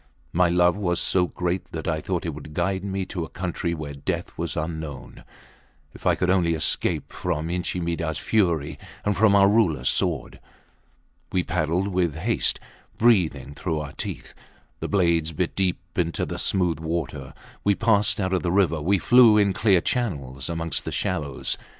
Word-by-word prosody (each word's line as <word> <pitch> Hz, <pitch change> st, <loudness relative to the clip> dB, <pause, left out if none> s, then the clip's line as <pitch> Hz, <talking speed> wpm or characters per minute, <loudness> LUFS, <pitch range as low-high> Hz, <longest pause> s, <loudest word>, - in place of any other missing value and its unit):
My 90 Hz, 0 st, +4 dB
love 90 Hz, 0 st, +4 dB
was 90 Hz, -4 st, 0 dB
so 90 Hz, -1 st, +2 dB
great, 90 Hz, +1 st, -3 dB
that -, -, -5 dB
I 80 Hz, -, 0 dB
thought 90 Hz, 0 st, -2 dB
it 80 Hz, -, -2 dB
could 75 Hz, +1 st, -10 dB
guide 95 Hz, +2 st, 0 dB
me 95 Hz, -1 st, -2 dB
to 90 Hz, -2 st, -4 dB
a 80 Hz, -, -7 dB
country 85 Hz, -1 st, -3 dB
where 75 Hz, -2 st, -6 dB
death 70 Hz, -, -4 dB
was 85 Hz, 0 st, -4 dB
unknown, 80 Hz, -4 st, -5 dB, 0.7 s
if -, -, -6 dB
I -, -, +4 dB
could 90 Hz, 0 st, +1 dB
only 85 Hz, -3 st, +2 dB
escape 80 Hz, 0 st, 0 dB
from 80 Hz, -2 st, -2 dB
Inchi 90 Hz, 0 st, -2 dB
Midahs 85 Hz, -2 st, -2 dB
fury 85 Hz, -10 st, 0 dB, 0.3 s
and 105 Hz, -1 st, +1 dB
from 100 Hz, +1 st, +4 dB
our 100 Hz, -1 st, +6 dB
Rulers 95 Hz, -, +2 dB
sword. -, -, -1 dB, 0.9 s
We 90 Hz, -, +1 dB
paddled 90 Hz, +3 st, 0 dB
with 90 Hz, -5 st, 0 dB
haste, 105 Hz, +9 st, 0 dB, 0.4 s
breathing 80 Hz, -, +2 dB
through 80 Hz, +1 st, -2 dB
our 75 Hz, -2 st, -6 dB
teeth. -, -, -6 dB, 0.5 s
The -, -, -3 dB
blades 85 Hz, -5 st, +2 dB
bit -, -, -2 dB
deep 95 Hz, -2 st, +1 dB, 0.2 s
into 85 Hz, -2 st, 0 dB
the -, -, -5 dB
smooth 90 Hz, -5 st, +1 dB
water. 80 Hz, -5 st, -4 dB, 0.3 s
We 100 Hz, 0 st, +3 dB
passed 105 Hz, -2 st, +2 dB
out 95 Hz, -1 st, 0 dB
of 95 Hz, -, +1 dB
the 85 Hz, -, -1 dB
river; 85 Hz, -5 st, +2 dB
we 95 Hz, +6 st, +2 dB
flew 120 Hz, +2 st, +6 dB
in 100 Hz, -2 st, +3 dB
clear 95 Hz, -5 st, +3 dB
channels 70 Hz, -, -2 dB
amongst 85 Hz, -1 st, -2 dB
the -, -, -5 dB
shallows. 70 Hz, -3 st, -2 dB
85 Hz, 175 wpm, -24 LUFS, 80-95 Hz, 0.9 s, our